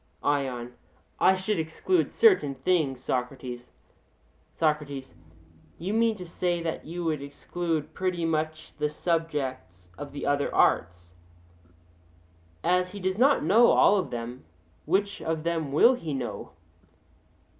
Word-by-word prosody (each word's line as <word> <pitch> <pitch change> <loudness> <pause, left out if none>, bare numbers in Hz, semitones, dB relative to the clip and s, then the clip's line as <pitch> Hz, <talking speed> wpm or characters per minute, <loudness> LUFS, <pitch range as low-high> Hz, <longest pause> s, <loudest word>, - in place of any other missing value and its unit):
ION: 130 -4 -1 0.5
I 190 - +5
should 190 0 -1
exclude 160 - 0
certain 375 - +4
things, 135 -2 0
Socrates. 125 -1 -4 0.9
SOCRATES: 150 -4 -1 0.6
You 185 +5 -3
mean 225 0 +2
to 185 -3 -8
say 175 0 -1
that 160 -2 -4
you 175 +2 -5
would 155 -4 -1
exclude 160 +2 -4
pretty 180 -3 -1
much 155 0 -2
the 150 0 +1
subjects 145 - -3
of 145 -1 -7
the 145 - -5
other 145 0 +1
arts. 90 0 +1 1.5
As 180 0 +1
he 205 - -6
does 190 +2 -2
not 275 +3 +4
know 215 +9 +6
all 205 - +5
of 185 -7 -1
them, 120 +1 -6 0.4
which 200 +5 0
of 160 -1 -2
them 165 -4 -1
will 235 - +6
he 165 - -4
know? 125 -3 -5
160 Hz, 130 wpm, -27 LUFS, 135-180 Hz, 1.5 s, know